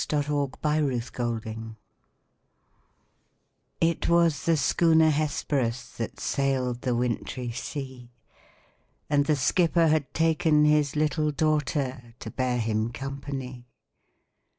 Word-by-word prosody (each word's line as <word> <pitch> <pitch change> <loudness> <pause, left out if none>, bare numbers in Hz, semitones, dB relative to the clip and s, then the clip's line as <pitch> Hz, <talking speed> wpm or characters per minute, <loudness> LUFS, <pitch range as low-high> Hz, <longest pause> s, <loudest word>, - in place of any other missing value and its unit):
THE 150 - +1
WRECK 145 0 -1
OF 140 -2 -2
THE 150 -3 +1
HESPERUS 115 -2 -4 2.0
It 165 0 +1
was 170 -3 +3
the 165 -1 +4
schooner 160 +2 +4
Hesperus, 140 -5 -1
That - - -5
sailed 130 -3 -1
the 125 -2 0
wintry 120 0 -2
sea; 130 -1 -6 1.0
And 145 -1 +3
the 155 - +3
skipper 165 +4 +2
had 155 -3 +1
taken 160 -1 +3
his 150 -2 +3
little 155 0 +1
daughter, 140 -5 -1
To - - -8
bear 130 -1 -1
him 110 0 -1
company. 135 -1 -6
140 Hz, 110 wpm, -26 LUFS, 125-155 Hz, 2.0 s, the